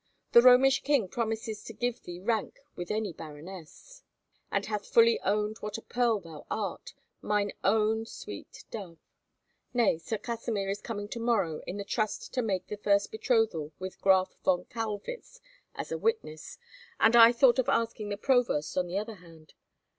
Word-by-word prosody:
The 235 - +9
Romish 255 +2 +6
king 275 -9 +2
promises 220 0 -3
to 225 - -8
give 245 +2 -2
thee 175 0 -8
rank 220 +2 -1 0.2
with 175 -1 -6
any 210 -4 -1
baroness, 165 - -11 0.5
and - - 0
hath 210 -2 -4
fully 230 0 +5
owned 210 +2 0
what 210 0 -5
a - - -8
pearl 240 -3 +1
thou 165 -5 -11
art, 205 -4 -4 0.3
mine 205 -1 0
own 220 +2 +2
sweet - - -9
dove! 185 -7 -7 0.8
Nay, 230 -9 +3
Sir 220 +6 -3
Kasimir 220 -3 -3
is 200 - -4
coming 205 -3 -5
to 235 - -5
morrow 200 -10 0
in 190 - -4
the 200 - -3
trust 215 +1 -2
to 255 - +1
make 195 -6 -1
the 210 - -6
first 200 -1 +2
betrothal 220 - 0
with 185 0 -7
Graf 190 -1 +3
von 180 -1 +2
Kaulwitz 225 - -6 0.4
as - - -6
a - - -2
witness, 440 - -2 0.4
and 225 +1 +5
I 230 0 +9
thought 245 0 +4
of 255 - +1
asking 225 -2 0
the 205 - -3
Provost 245 - +1
on 180 - -1
the 180 +2 -3
other 215 +1 -4
hand." 165 -3 -17
210 Hz, 170 wpm, -29 LUFS, 190-230 Hz, 0.8 s, The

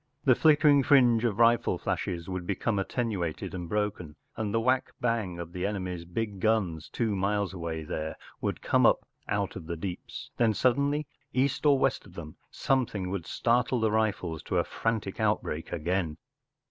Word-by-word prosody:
The 130 - +6
flicker¬ 155 +3 +4
ing 145 -1 +7
fringe 125 -4 +5
of 105 -4 0
rifle 115 0 +4
flashes 85 -1 -3
would 90 -2 -4
be¬ 100 - -2
come 105 -3 0
attenuated 95 -7 -2
and 90 -2 -5
broken, 100 -7 -2 0.2
and 105 -2 -2
the 115 - +2
whack 125 +3 +1
bang 115 -7 -1
of 85 0 -7
the 90 -1 -4
enemy’s 90 -4 -3
big 100 +3 -3
guns 95 -7 0
two 110 -4 -1
miles 100 0 0
away 85 -3 -4
there 80 +1 -4 0.3
would - - -2
come - - +4
up - - +2 0.2
out 100 -1 -1
of 85 -4 -8
the 85 -1 -3
deeps* 90 +1 -6
Then 115 -3 +3
suddenly, 140 +5 +2 0.3
east 140 +3 +1
or 140 -1 +6
west 135 -5 0
of 90 - -17
them, 80 -2 -8
something 110 -9 -1
would 95 -4 -4
startle 120 +1 +1
the 110 -1 +2
rifles 105 -7 0
to - - -1
a - - +3
frantic 110 -4 -2
outbreak 105 -7 -1
again. 85 -1 -1
105 Hz, 180 wpm, -28 LUFS, 90-120 Hz, 0.3 s, ing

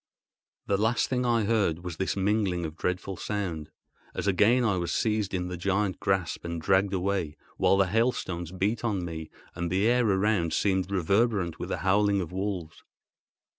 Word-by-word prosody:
The 100 - +1
last 115 +3 +1
thing 125 -1 0
I 115 -2 +2
heard 100 -6 +1
was 90 -3 -6
this 95 - -1
mingling 95 -3 +1
of 80 -1 -6
dreadful 90 +2 -3
sound, 90 -8 -3 0.5
as - - -3
again 105 +6 +4
I 100 -5 +2
was 85 -1 -2
seized 105 -3 0
in 90 -1 -2
the 90 0 -5
giant 100 +2 0
grasp 95 -4 -1
and 85 -1 -4
dragged 95 +4 +2
away, 95 -5 -1 0.2
while 95 - +3
the 100 - +4
hailstones 95 -5 -1
beat 100 +5 -1
on 100 -6 -1
me, 80 -2 -6 0.2
and 85 0 -3
the 95 +4 +1
air 120 -2 +3
around 95 -4 +1
seemed 95 -2 +1
reverberant 100 -1 +1
with - - -5
the - - -1
howling 100 +1 +3
of 90 -3 -4
wolves. 95 -4 -4
95 Hz, 175 wpm, -28 LUFS, 90-105 Hz, 0.5 s, again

